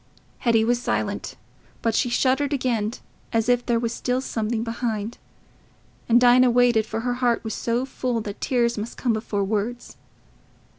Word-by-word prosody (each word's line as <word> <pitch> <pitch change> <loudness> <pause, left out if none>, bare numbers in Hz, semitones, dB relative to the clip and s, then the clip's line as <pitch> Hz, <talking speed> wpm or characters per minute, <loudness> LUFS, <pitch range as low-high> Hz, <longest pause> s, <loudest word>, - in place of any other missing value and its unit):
Hetty 225 -2 +3
was 240 +1 +1
silent, - - -2 0.5
but 230 - +1
she 245 - +1
shuddered 265 +4 +1
again, 235 -5 0 0.4
as 225 -1 +1
if 245 -1 +3
there 235 -1 +1
was 230 0 -1
still 250 +1 -1
something 225 -3 -2
behind; 230 -1 -3 0.9
and 235 +1 +6
Dinah 250 +1 +6
waited, 240 -2 +3
for 225 - -3
her 245 +1 -1
heart 240 -2 +2
was 220 - -4
so 240 +2 -1
full 250 -3 -2
that 205 -1 -7
tears 235 -3 +1
must 220 +3 -6
come 240 -3 +1
before 215 -2 -2
words. 220 +4 -3
235 Hz, 160 wpm, -24 LUFS, 225-245 Hz, 0.9 s, and